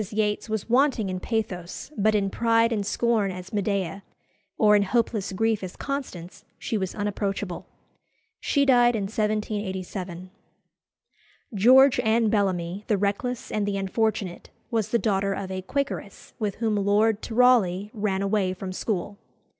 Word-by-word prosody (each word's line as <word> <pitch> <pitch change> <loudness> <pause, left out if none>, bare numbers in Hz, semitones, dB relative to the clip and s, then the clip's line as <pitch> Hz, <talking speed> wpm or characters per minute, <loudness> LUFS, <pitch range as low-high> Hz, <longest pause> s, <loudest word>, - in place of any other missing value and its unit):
Yates 210 0 -1
was 220 -2 -2
wanting 240 -5 +2
in 185 - -3
pathos, 200 - -4
but 215 +1 +2
in 195 -2 +1
pride 230 +1 +2
and 205 -3 -1
scorn 225 -3 +1
as 185 +1 -8
Medea, 200 -3 -1 0.6
or 210 -1 +5
in 205 - +4
hopeless 215 -1 0
grief 220 +1 0
as 185 - -6
Constance, 250 -12 -6
she - - -3
was 190 -3 -2
unapproachable. 200 -3 -3 0.7
She 280 -1 +1
died 245 -3 +5
in 210 - -1
1787. 195 -4 -3 1.2
George 255 +6 +6
Anne 220 0 +2
Bellamy, 190 -2 0
the 210 - +2
reckless 205 +5 -2
and 205 -1 -1
the 200 -1 -1
unfortunate, 195 -1 -2 0.2
was 225 -4 0
the 235 - +2
daughter 195 -3 0
of 190 -1 -5
a 185 0 -3
Quakeress, 280 +8 -4
with 210 -3 -2
whom 220 -2 0
Lord 205 +2 +2
Tyrawley 220 -5 +3
ran 200 -3 -1
away 195 -2 0
from 185 0 -6
school. 200 0 -3
210 Hz, 145 wpm, -25 LUFS, 190-225 Hz, 1.2 s, George